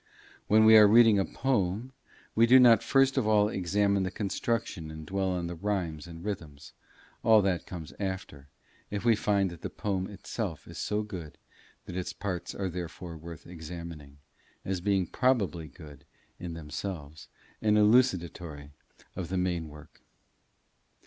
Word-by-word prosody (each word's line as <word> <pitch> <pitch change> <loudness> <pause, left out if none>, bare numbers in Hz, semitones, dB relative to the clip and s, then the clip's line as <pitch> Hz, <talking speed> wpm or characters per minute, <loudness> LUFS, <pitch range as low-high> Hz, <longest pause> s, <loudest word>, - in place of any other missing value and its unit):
When 110 +1 +5
we 110 0 +8
are 105 -1 +9
reading 110 -1 +6
a 95 - +1
poem, 115 -1 -1 0.4
we 115 +1 +4
do 130 +2 +8
not 120 -3 +7
first 135 0 +3
of 110 - -1
all 105 -1 +4
examine 100 +1 +1
the 95 - -1
construction 100 -3 -3
and 80 0 -8
dwell 95 +2 -1
on 90 -2 -2
the 85 - -4
rhymes 85 -4 -3
and 85 +2 -10
rhythms; 75 -9 -6 0.5
all 110 -3 +5
that 95 -3 -1
comes 85 -4 -8
after, 95 -8 -5 0.4
if 105 +2 -4
we 115 -1 +5
find 100 -3 +1
that 85 - -11
the - - -4
poem 95 -2 -2
itself 100 -3 -6
is - - -9
so 105 0 -1
good 90 -8 -8 0.5
that 90 - -8
its 90 -1 -3
parts 90 -3 -5
are 95 - -2
therefore 85 0 -6
worth 80 0 -10
examining, 80 -4 -9 0.5
as 95 -2 -2
being 95 -1 +1
probably 100 - 0
good 75 -3 -13 0.4
in 85 -2 -6
themselves, 75 -1 -7 0.3
and 105 -1 +3
elucidatory 90 - +2 0.4
of 90 -3 -5
the 95 - -1
main 90 -3 -1
work. 75 0 -15
95 Hz, 155 wpm, -29 LUFS, 85-105 Hz, 0.5 s, are